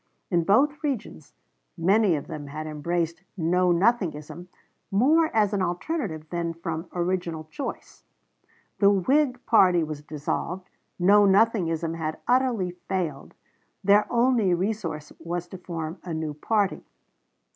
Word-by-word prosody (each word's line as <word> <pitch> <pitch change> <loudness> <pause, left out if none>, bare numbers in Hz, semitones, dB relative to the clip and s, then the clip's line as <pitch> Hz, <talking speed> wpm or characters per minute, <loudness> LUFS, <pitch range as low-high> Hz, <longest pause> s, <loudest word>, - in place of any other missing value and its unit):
In 170 -2 +2
both 285 - +3
regions 215 - -4 0.4
many 190 +2 +3
of 145 - -4
them 150 -3 -7
had 155 +2 -6
embraced 165 +3 -2 0.2
Know 180 +2 +2
Nothingism, 175 -4 0 0.4
more 300 +11 +4
as 210 -2 +2
an 200 - 0
alternative 175 - -3
than 170 -1 -2
from 165 0 -5
original 175 -2 -2
choice. 280 - -7 0.8
The 200 - +6
Whig 250 +7 +2
party 180 -7 +5
was 155 -2 -5
dissolved; 155 +5 -4 0.3
Know 200 +3 +5
Nothingism 180 -6 +2
had 160 -1 -3
utterly 245 -7 +2
failed 175 -5 -4 0.5
their 205 +2 +4
only 235 -6 +3
resource 170 -6 -3
was 175 +1 -4
to 185 - -9
form 165 -1 -5
a 170 -3 -4
new 160 -1 -3
party. 200 +6 0
180 Hz, 125 wpm, -26 LUFS, 165-210 Hz, 0.8 s, The